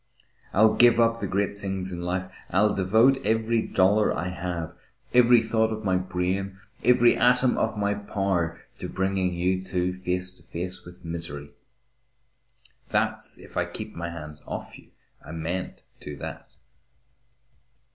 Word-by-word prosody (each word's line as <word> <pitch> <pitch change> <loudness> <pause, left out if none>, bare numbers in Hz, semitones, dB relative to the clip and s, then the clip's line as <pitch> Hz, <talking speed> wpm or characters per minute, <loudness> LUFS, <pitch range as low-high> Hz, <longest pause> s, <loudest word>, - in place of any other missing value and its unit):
I'll 110 +2 +5
give 120 -1 +6
up 115 0 +3
the 100 - -2
great 100 +1 -1
things 95 -1 -3
in 85 -1 -5
life. 90 +1 -2 0.2
I'll 105 +4 +3
devote 110 +8 +3
every 115 +1 +1
dollar 105 +2 +3
I 85 - -2
have, 90 -2 -4 0.4
every 120 -1 +7
thought 110 0 +1
of 110 0 -4
my 95 -2 +2
brain, 95 +1 -2 0.3
every 120 -1 +5
atom 125 +1 +4
of - - 0
my 100 0 +1
power, 95 -5 -1 0.2
to - - -5
bringing 95 -1 0
you 95 +2 0
two 90 -1 -1
face 90 0 -3
to 90 - -22
face 90 +2 -5
with 90 0 -13
misery. 80 -4 -5 1.4
That's - - 0
if - - -14
I - - +1
keep - - -8
my 85 0 -4
hands 75 -3 -9
off - - -6
you. - - -19 0.4
I 80 - -9
mayn't 85 +3 -4 0.2
do 75 -1 -8
that." - - -7
95 Hz, 150 wpm, -26 LUFS, 90-110 Hz, 1.4 s, every